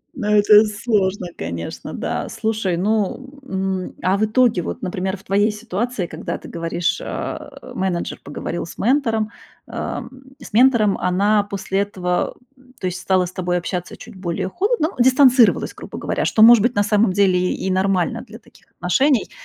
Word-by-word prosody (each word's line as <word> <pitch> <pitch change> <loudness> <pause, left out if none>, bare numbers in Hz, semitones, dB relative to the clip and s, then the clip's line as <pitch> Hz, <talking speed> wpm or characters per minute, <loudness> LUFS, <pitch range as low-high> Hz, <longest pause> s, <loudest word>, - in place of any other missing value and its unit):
Ну, 230 -6 -4
это 210 0 +6
сложно, 205 -3 -1
конечно, 85 0 -6
да. - - -3
Слушай, 215 -5 -1
ну, 220 +8 -1
м, 190 -2 -3
а 185 +1 +3
в 215 - +2
итоге 225 -3 +2
вот, - - -6
например, 190 +1 -2
в 190 - -19
твоей 205 +2 +2
ситуации, 215 0 -3
когда 160 -1 -5
ты - - -12
говоришь, 170 +1 -2
а, - - -6
менеджер 185 -2 -2
поговорил 165 +4 -5
с - - -11
ментором, 225 -4 +1 0.3
ам - - -5 0.3
с - - -12
ментором. 230 -4 +4
Она 200 +4 +2
после 195 -1 -3
этого, 185 -3 -1 0.2
м 255 -1 -23
то - - -5
есть, 185 0 -2
стала 185 -1 +2
с 175 - -7
тобой 180 -1 -1
общаться 180 0 -4
чуть - - -12
более 185 0 -3
холодно, 400 - 0
ну 245 - +3
дистанцировалась, 255 -2 +5
грубо - - -9
говоря. - - -2
Что 220 - +4
может 235 -1 +9
быть 240 +3 +1
на 205 - +3
самом 210 0 +2
деле 185 -2 +2
и 190 - -3
нормально 190 +3 0
для 225 -2 -12
таких 230 - -23
отношений, 260 - +1
200 Hz, 170 wpm, -20 LUFS, 185-225 Hz, 0.3 s, может